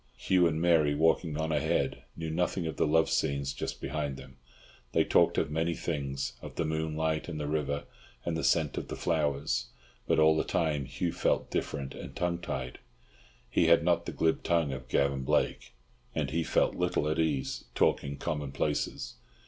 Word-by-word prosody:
Hugh 90 -2 +3
and 80 -1 -1
Mary, 80 -4 +4
walking 80 0 +2
on 80 0 -1
ahead, 75 -3 0 0.2
knew 80 -1 -3
nothing 90 +1 0
of 80 -2 -3
the - - +2
love 80 +2 +4
scenes 70 -1 0
just 70 - -4
behind 75 -3 -3
them. 65 0 -12 0.6
They - - +4
talked - - +3
of 75 - +1
many 80 +2 0
things, 70 -5 -3
of - - -9
the 85 - 0
moonlight 80 0 -1
and 80 -2 -4
the 75 - -2
river 70 -1 -1 0.4
and 85 - -1
the 80 - -2
scent 80 -4 +2
of - - -7
the - - -5
flowers, 75 -6 0 0.4
but - - +3
all 80 0 +6
the 80 - +1
time 75 -5 0
Hugh 70 +6 -2
felt - - 0
diffident 70 -1 -2
and - - -9
tongue 85 -1 -1
tied. 65 -7 -5 0.7
He 85 - +2
had 85 0 +6
not 85 0 +2
the - - -2
glib 80 0 +1
tongue 80 -4 +1
of 65 -1 -7
Gavan 70 +1 +1
Blake, 65 - 0 0.4
and - - -1
he 85 +1 +1
felt - - +2
little 90 -4 0
at 75 +1 0
ease 75 -5 -1
talking 70 0 +1
common 75 -3 -3
places. - - -2
80 Hz, 185 wpm, -30 LUFS, 70-80 Hz, 0.7 s, all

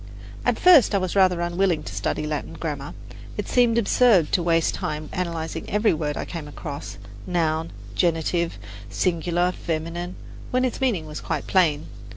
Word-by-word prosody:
At - - +1
first 330 - +6
I - - +5
was 185 -1 -2
rather 185 -3 +4
unwilling 175 -2 +1
to - - -7
study - - -2
Latin 150 -1 -3
grammar. 145 -3 -5 0.4
It - - -3
seemed 240 -2 +3
absurd 220 -6 +4
to 180 - +2
waste 165 -1 +2
time 150 0 -4
analyzing, 165 -2 -3
every 210 +2 +3
word 150 -2 -2
I - - -3
came 165 -4 -6
across 145 - -7 0.3
noun, 165 -2 0 0.2
genitive, 170 - 0 0.3
singular, 175 - 0
feminine 170 +1 -4 0.3
when 255 +1 +1
its 255 - -3
meaning 220 -12 +1
was 150 -1 -7
quite - - -3
plain. 160 -6 +2
170 Hz, 160 wpm, -24 LUFS, 155-185 Hz, 0.4 s, first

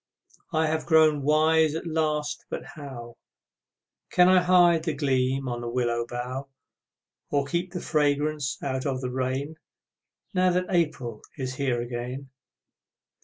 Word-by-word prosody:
I 160 -1 +2
have 155 0 -1
grown 155 -3 +5
wise 155 +2 +3
at 165 - -4
last 155 -2 -1
but - - -4
how 125 -6 -9 0.9
Can 180 0 +5
I 185 -1 +6
hide 175 -2 +5
the 160 -3 -2
gleam 135 -2 0
on 120 -1 -3
the 120 - -4
willow 120 -1 -1
bough, 125 +3 -5 0.8
Or 140 -1 +1
keep 175 +5 -2
the 180 -1 -5
fragrance 145 -1 0
out 130 0 -2
of 130 -2 -2
the 125 -1 -3
rain 130 +4 -2 0.8
Now 185 -1 +3
that 180 +1 +1
April 150 - -1 0.2
is 130 -2 -3
here 130 -4 0
again? 125 +3 -6
145 Hz, 140 wpm, -26 LUFS, 130-160 Hz, 0.9 s, I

